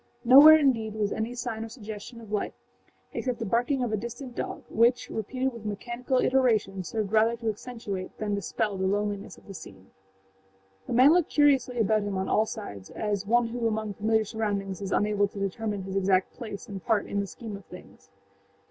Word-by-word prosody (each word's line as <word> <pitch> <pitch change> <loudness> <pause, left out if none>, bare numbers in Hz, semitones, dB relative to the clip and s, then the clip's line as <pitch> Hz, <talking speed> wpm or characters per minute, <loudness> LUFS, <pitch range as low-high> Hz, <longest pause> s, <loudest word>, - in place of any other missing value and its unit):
Nowhere, 285 +6 +10
indeed, 230 -7 +1
was 210 -2 -1
any 225 +3 -3
sign 235 -2 -4
or 225 - -7
suggestion 220 0 -9
of 215 -2 -12
life 210 - -2 0.6
except 250 -2 -2
the 225 - -4
barking 245 +6 +1
of 240 - -2
a - - +1
distant 240 +4 -7
dog, - - -4
which, 240 +2 +2
repeated 255 +4 -2
with 230 -2 -10
mechanical 240 +5 -2
iteration, 225 -8 +2
served 205 +3 -3
rather 220 +1 +3
to 230 -1 -3
accentuate 210 -4 -6
than 210 -1 -2
dispel 200 0 -2
the 190 0 0
loneliness 205 0 -2
of - - -19
the 195 - -9
scene. 95 - -12 1.0
The - - -3
man 255 +5 +7
looked 350 -2 +2
curiously 275 -4 +3
about 215 -1 +2
him 200 -1 -3
on 190 - -2
all 215 +1 +2
sides, 100 - -7
as 205 -2 -3
one 240 +1 +3
who 235 0 -1
among 215 -1 -2
familiar 220 +2 +1
surroundings 200 -3 -3
is 195 0 -4
unable 205 -1 +2
to 200 - -9
determine 200 +1 -3
his 190 0 -6
exact 190 -1 +2
place 215 -4 -8
and 195 -3 -7
part 215 -3 +1
in 200 - -2
the 200 - -2
scheme 220 +1 -8
of 200 - -11
things. 180 - -14
215 Hz, 195 wpm, -27 LUFS, 200-240 Hz, 1.0 s, Nowhere